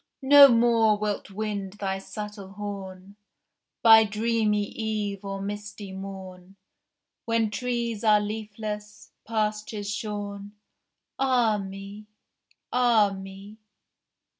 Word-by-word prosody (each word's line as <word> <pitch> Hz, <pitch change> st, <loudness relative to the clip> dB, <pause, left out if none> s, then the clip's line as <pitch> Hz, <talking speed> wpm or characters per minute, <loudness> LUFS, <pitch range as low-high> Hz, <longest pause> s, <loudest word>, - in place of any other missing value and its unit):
No 280 Hz, +1 st, +10 dB
more 230 Hz, -3 st, +4 dB
wilt 210 Hz, -1 st, -3 dB
wind 200 Hz, -1 st, -4 dB
thy 195 Hz, -2 st, -3 dB
subtle 205 Hz, -1 st, -8 dB
horn 200 Hz, -1 st, -8 dB, 0.7 s
By 225 Hz, -1 st, +9 dB
dreamy 215 Hz, -1 st, 0 dB
eve 210 Hz, -2 st, -4 dB
or 195 Hz, 0 st, -5 dB
misty 205 Hz, 0 st, -6 dB
morn, 190 Hz, -1 st, -9 dB, 0.7 s
When 230 Hz, -2 st, +1 dB
trees 235 Hz, -1 st, -2 dB
are 215 Hz, -1 st, +5 dB
leafless, 210 Hz, 0 st, -6 dB, 0.2 s
pastures 215 Hz, -1 st, -2 dB
shorn. 205 Hz, -1 st, -5 dB, 0.7 s
Ah 245 Hz, -5 st, +2 dB
me! 195 Hz, +2 st, -8 dB, 0.7 s
ah 235 Hz, -5 st, +4 dB
me! 195 Hz, +2 st, -10 dB
210 Hz, 95 wpm, -26 LUFS, 200-220 Hz, 0.7 s, No